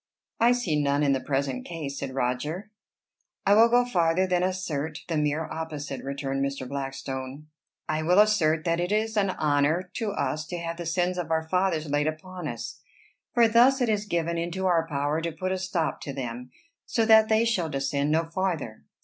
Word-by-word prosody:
"I 235 +2 +5
see 175 -12 0
none 140 +1 +1
in 140 - +3
the 135 - +1
present 135 -2 -1
case," 150 -5 -5
said 135 -1 -5
Roger. 150 +11 -2 0.7
"I 200 - +5
will 225 +3 +7
go 245 +1 +4
farther 180 -5 +2
than 180 -1 +1
assert 160 -5 -2
the 165 - -2
mere 150 +1 +1
opposite," 150 -4 -5
returned 135 0 -2
Mr. 140 -2 -3
Blackstone. 135 +1 -5 0.4
"I 155 0 -1
will 175 +4 +2
assert 170 -7 +4
that 170 0 +1
it 175 +2 -1
is 220 +1 0
an 200 -2 +2
honor 155 +2 +1
to 225 -3 -1
us 155 -5 -2
to 175 - -4
have 170 0 -4
the 170 -1 -5
sins 180 +2 0
of 165 -3 -4
our 160 0 0
fathers 180 -3 +1
laid 145 +1 +1
upon 180 +4 -5
us. - - -6 0.5
For 235 -1 +6
thus 245 +4 +5
it 245 -3 +1
is 210 -1 0
given 170 -3 -1
into 175 +3 -3
our 170 -3 +2
power 145 +1 -1
to 165 0 -2
put 185 +4 -3
a 190 - -1
stop 185 -4 -2
to 140 - -5
them, 125 -2 -5 0.4
so 225 - +1
that 220 -1 +6
they 220 +1 +4
shall 185 -8 0
descend 140 0 -1
no 160 +2 +2
farther. 165 - -3
165 Hz, 195 wpm, -26 LUFS, 145-185 Hz, 0.7 s, will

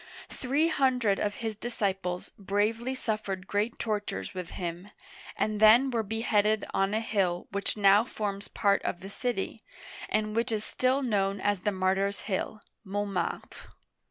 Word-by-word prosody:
Three 280 +5 +1
hundred 250 -9 +2
of 205 0 -1
his 220 -1 -2
disciples 195 -5 -2
bravely 215 +6 0
suffered 210 -6 -3
great 210 +4 -1
tortures 210 -2 -3
with 180 -2 -5
him, 175 +2 -5 0.5
and 215 -1 0
then 235 +5 +7
were 235 -2 +1
beheaded 215 0 +1
on 195 +2 +1
a - - +2
hill 190 -6 0
which 200 +2 -2
now 200 +1 +6
forms 205 -4 -4
part 200 -1 +2
of 175 - -3
the 195 +1 -8
city, 230 -1 -3 0.5
and 215 0 0
which 230 0 +1
is 215 -1 -1
still 260 +2 +1
known 200 -4 +1
as 205 0 +1
the 210 - 0
Martyrs' 195 +1 0
Hill(Montmartre). 200 -2 -4
205 Hz, 145 wpm, -29 LUFS, 195-225 Hz, 0.5 s, then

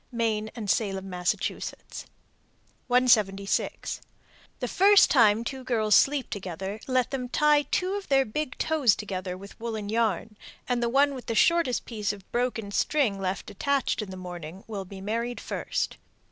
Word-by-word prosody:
Maine 220 -2 -1
and 220 -4 -5
Salem, 195 -2 -1
Mass. 180 0 +1
176. 215 -6 -2 0.6
The - - -2
first 400 +1 +6
time 225 -4 +5
two 260 +2 -5
girls 220 -4 +1
sleep 280 +3 +3
together 190 +1 -5
let 255 -1 +1
them 250 -2 -3
tie 300 +2 +4
two 370 +1 0
of 405 -1 -4
their 270 -1 +4
big 255 +5 -4
toes 290 -10 +3
together 185 -3 -5
with 200 +3 -12
woollen 220 -3 -4
yarn, 220 -1 0 0.3
and 245 -1 0
the 235 - +1
one 280 +3 +3
with 255 -2 -8
the 230 - -1
shortest 335 -3 +3
piece 210 -4 -2
of 200 -2 -12
broken 240 -4 -1
string 230 -4 +1
left 190 0 -3
attached 275 +4 0
in 210 - -6
the 185 - -7
morning 180 0 -8
will 200 -3 -5
be 190 +1 -10
married 230 +4 -2
first. - - -3
225 Hz, 160 wpm, -27 LUFS, 195-255 Hz, 0.6 s, first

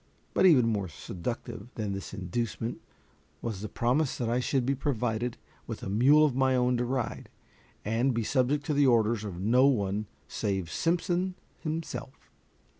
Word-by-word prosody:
But 190 - +5
even 135 -9 +6
more 105 -4 0
seductive 100 - -6
than 105 -3 -2
this 95 0 -6
inducement 115 +4 -3 0.6
was 110 -5 -4
the 105 - -5
promise 130 +4 +1
that 120 - -1
I 120 +2 +2
should 130 0 0
be 135 - +2
provided 120 -4 -1 0.3
with - - -6
a - - -3
mule 140 +9 +6
of 140 -5 0
my 130 0 +3
own 125 0 +2
to 120 - 0
ride, 125 -2 -3 0.6
and 115 +5 +2
be 115 -2 -1
subject 140 +4 +1
to 150 - 0
the 140 -1 +4
orders 115 -2 +3
of 95 -5 -5
no 125 +7 +4
one 105 -5 0 0.2
save 95 -6 -2
Simpson 180 - 0 0.2
himself. 155 -4 -5
120 Hz, 165 wpm, -29 LUFS, 105-135 Hz, 0.6 s, even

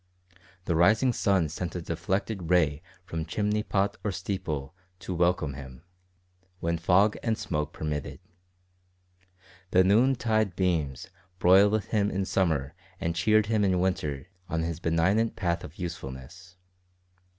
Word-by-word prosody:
The 85 - 0
rising 110 +9 +4
sun 95 -7 +2
sent 85 +4 -5
a 90 - -3
deflected 90 +2 -3
ray 80 -5 +3 0.2
from 80 -3 -4
chimney 105 +6 -1
pot 100 -1 0
or 105 - 0
steeple 90 -6 -4 0.2
to 95 - -6
welcome 85 -4 +1
him 65 0 -10 0.8
when 85 0 -1
fog 95 +5 +3
and 110 -2 0
smoke 75 -7 -3
permitted. 75 -2 -4 1.5
The 95 +1 +5
noon 115 +8 +4
tide 110 -6 0
beams 80 -8 -1 0.3
broiled 100 +4 +5
him 105 0 0
in 95 -1 -1
summer 80 -8 0 0.3
and 85 0 -2
cheered 110 +5 +3
him 110 -1 +1
in 95 -2 +2
winter 75 -7 -1 0.2
on 80 0 -1
his 85 -1 -3
benignant 95 +7 +1
path 85 -2 -1
of 75 - -10
usefulness. 85 +1 -8
90 Hz, 135 wpm, -27 LUFS, 80-100 Hz, 1.5 s, The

